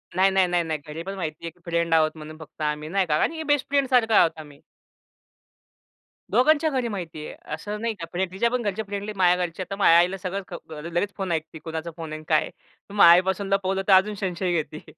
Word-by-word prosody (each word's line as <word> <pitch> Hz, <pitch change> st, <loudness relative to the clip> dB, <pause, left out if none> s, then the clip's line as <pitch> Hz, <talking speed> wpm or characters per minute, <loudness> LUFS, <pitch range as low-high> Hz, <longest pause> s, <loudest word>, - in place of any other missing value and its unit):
नाही, 190 Hz, +2 st, +4 dB
नाही, 190 Hz, -1 st, +3 dB
नाही, 175 Hz, -1 st, +1 dB
नाही. 160 Hz, -2 st, -3 dB
घरी 160 Hz, +2 st, -6 dB
पण 195 Hz, +2 st, -6 dB
माहिती 160 Hz, -4 st, -5 dB
आहे 165 Hz, -, -3 dB
की 175 Hz, -, -30 dB
फ्रेंड 170 Hz, -1 st, 0 dB
आहोत 155 Hz, -1 st, +4 dB
म्हणून 155 Hz, 0 st, -9 dB
फक्त 155 Hz, 0 st, -13 dB
आम्ही 150 Hz, 0 st, -2 dB
नाही 195 Hz, +2 st, +1 dB
का, 150 Hz, -3 st, +1 dB
कारण 320 Hz, -, 0 dB
बेस्ट 290 Hz, -2 st, +2 dB
फ्रेंड 280 Hz, -1 st, +2 dB
सारखं 235 Hz, -4 st, +3 dB
आहोत 165 Hz, -, +6 dB
आम्ही. 145 Hz, -2 st, -12 dB, 1.7 s
दोघांच्या 295 Hz, +8 st, +4 dB
घरी 255 Hz, -4 st, -1 dB
माहिती 170 Hz, -7 st, -6 dB
आहे. -, -, -9 dB, 0.2 s
असं 205 Hz, +7 st, -5 dB
नाही 230 Hz, 0 st, -1 dB
का, 170 Hz, -6 st, -7 dB
म्हणजे 185 Hz, +2 st, 0 dB
तिच्यापण 235 Hz, +5 st, 0 dB
घरचे 205 Hz, 0 st, -2 dB
फ्रेंडली 205 Hz, +1 st, -4 dB
माझ्या 180 Hz, -1 st, +3 dB
घरचे, 170 Hz, +2 st, -6 dB
तर 195 Hz, -, -3 dB
माझ्या 170 Hz, -4 st, +5 dB
आईला 180 Hz, +3 st, +3 dB
सगळं 190 Hz, +1 st, -4 dB, 0.3 s
अ, 150 Hz, -, -7 dB
लगेच 175 Hz, +5 st, -2 dB
फोन 190 Hz, -3 st, -3 dB
ऐकते 160 Hz, 0 st, -3 dB
कोणाचा 160 Hz, +1 st, -5 dB
फोन 160 Hz, -2 st, -7 dB
आहे 155 Hz, -, -4 dB
आणि 155 Hz, -, -12 dB
काय 155 Hz, -2 st, +4 dB
आहे? -, -, -6 dB, 0.4 s
मग 205 Hz, -, +5 dB
आईपासून 185 Hz, +3 st, +5 dB
लपवलं, 195 Hz, 0 st, 0 dB
तर 195 Hz, -, +6 dB
अजून 200 Hz, +3 st, +4 dB
संशय 185 Hz, -2 st, -2 dB
घेते. 150 Hz, +1 st, -11 dB
180 Hz, 225 wpm, -24 LUFS, 160-200 Hz, 1.7 s, आहोत